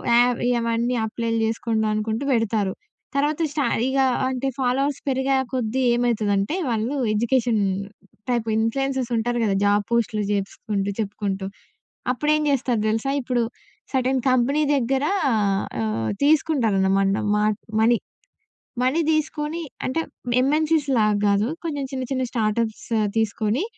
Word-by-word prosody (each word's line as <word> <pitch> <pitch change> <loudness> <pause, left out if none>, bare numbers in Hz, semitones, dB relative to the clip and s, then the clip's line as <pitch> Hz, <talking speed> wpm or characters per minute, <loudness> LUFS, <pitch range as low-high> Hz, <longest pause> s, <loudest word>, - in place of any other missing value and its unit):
యావ్ 245 0 +4
ఇవన్నీ 235 0 0
అప్లైలు 230 +1 -2
జేసుకొండి 225 0 -1
అనుకుంటూ 220 +3 -2
పెడతారు. 220 -4 0 0.4
తర్వాత 295 +3 +1
స్ట 300 - -4 0.3
ఇగ 265 +1 -1 0.3
అంటే, 260 +1 -2
ఫాలోవర్స్ 270 +2 +1
పెరిగే 265 +1 +1 0.2
కొద్దీ 255 0 -1
ఏమైతుదంటే 215 - +1
వాళ్ళు 230 +3 -1 0.2
ఎడ్యుకేషన్ 235 0 +1 0.7
టైప్ 240 -2 +1
ఇన్‌ప్ల్యూయన్సర్స్ 260 +3 0
ఉంటారు 240 +2 0
కదా! 200 -3 +1
జాబు 205 0 +3
పోస్టులు 225 -2 +1
జేసుకుంటూ 200 0 -2
చెప్పుకుంటూ, 200 -2 -2 0.7
అప్పుడేం 300 +4 +1
జేస్తారు 255 -5 +1
తెలుసా? 225 +5 0
ఇప్పుడు 245 -1 0 0.5
సెర్టైన్ 260 0 +1
కంపెనీ 255 +4 +2
దగ్గర 270 +1 0 0.8
ఆహ్, 110 0 -1
తీసుకుంటారనమాట 200 -10 +2
మాట్ 210 0 +1 0.2
మనీ. 235 +2 +4 0.9
మనీ 260 +6 +2
తీసుకొని 310 +1 -1 0.2
అంటే 260 +6 0 0.4
ఎం‌ఎన్‌సీస్‌లాగా 280 -6 +2
గాదు. 200 +1 +3 0.2
కొంచెం 290 -4 -2
చిన్న 260 -1 -3
చిన్న 260 -1 0
స్టార్టప్స్ 220 -1 -1 0.3
తీసుకొని, 225 - 0
235 Hz, 115 wpm, -23 LUFS, 215-270 Hz, 0.9 s, యావ్